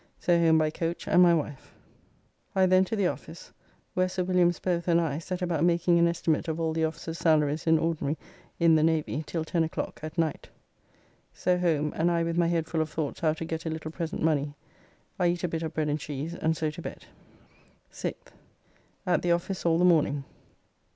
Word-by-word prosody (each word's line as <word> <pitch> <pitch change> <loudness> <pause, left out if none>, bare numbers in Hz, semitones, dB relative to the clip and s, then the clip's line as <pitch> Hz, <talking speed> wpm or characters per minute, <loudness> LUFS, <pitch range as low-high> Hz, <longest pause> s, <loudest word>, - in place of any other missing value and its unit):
So 175 - +2
home 165 -1 +5
by 155 -1 +2
coach 165 +2 -4
and 180 - +5
my 175 -1 +6
wife. 145 -3 -5 0.8
I 190 -1 +5
then 185 0 +5
to 225 - -3
the 200 -3 +1
office, - - -5 0.4
where 185 0 +1
Sir 185 0 -2
Williams 175 -2 +2
both 175 -2 -2
and 170 -1 +4
I 155 -3 -1
set 180 +2 -4
about 170 -3 0
making 170 0 +3
an 170 - +5
estimate 170 -1 0
of 160 0 -2
all 160 -1 0
the 160 0 +1
officers' 160 +1 -5
salaries 155 -1 +2
in 160 0 +5
ordinary 160 -2 -1 0.4
in 170 -1 +5
the 155 - +4
Navy 160 -1 0
till 165 -2 -3
10 165 +1 +1
o'clock 165 +4 -4
at 155 +2 -7
night. 160 -3 -1 0.9
So 180 -1 +1
home, 155 -4 +1
and 165 +2 +2
I 170 -1 +1
with 165 0 -2
my 170 -1 +3
head 165 -1 0
full 160 -1 -1
of 155 - -2
thoughts 150 -2 -3
how 155 -2 +2
to 165 +1 -6
get 160 0 -4
a - - 0
little 160 0 -5
present 165 -1 -4
money, 145 -2 +1 0.6
I 180 - +3
eat 175 +1 -1
a - - +2
bit 165 -1 -3
of 160 -1 -5
bread 155 -1 0
and 150 +1 -1
cheese, 150 +3 -5
and 160 -2 -1
so 155 -1 -1
to 165 +3 -9
bed. - - -8 0.9
6th. - - -6 0.7
At 180 - +2
the 175 - +1
office 175 +1 -1
all 165 0 +3
the 180 - +3
morning. 150 -5 +3
165 Hz, 210 wpm, -28 LUFS, 155-175 Hz, 0.9 s, my